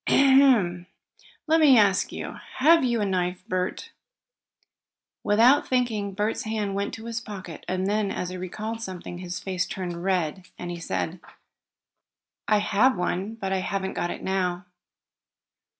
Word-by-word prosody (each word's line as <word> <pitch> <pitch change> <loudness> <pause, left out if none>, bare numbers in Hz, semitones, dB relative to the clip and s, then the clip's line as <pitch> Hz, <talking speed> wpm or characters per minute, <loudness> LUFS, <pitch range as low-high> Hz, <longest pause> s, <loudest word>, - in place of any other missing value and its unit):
"Ahem! 260 -11 +4 0.6
Let 320 +1 +3
me 285 -5 +7
ask 200 -3 +3
you, - - -6 0.2
have 325 +3 +5
you 235 -3 +1
a - - +1
knife, 185 0 -2
Bert?" 185 - -3 1.3
Without 235 +7 +4
thinking 220 -6 0
Bert's 210 +2 -1
hand 215 -2 -2
went 200 +1 -2
to 225 - -10
his 230 -1 -4
pocket, 190 -7 -8
and 185 +1 -1
then, 205 0 0
as 180 - -3
he 185 - -6
recalled 215 +5 -5
something, 180 -4 -7
his 180 0 -5
face 185 -2 -2
turned 175 -2 -5
red, 185 -1 -1
and 175 0 -5
he 175 - -6
said: 170 +1 -3 1.3
"I 215 - +4
have 210 +3 +3
one, 185 +4 -2
but 195 -3 -3
I 190 - +1
haven't 190 0 -2
got 175 - -2
it - - -6
now." 185 -1 -1
195 Hz, 150 wpm, -25 LUFS, 180-225 Hz, 1.3 s, me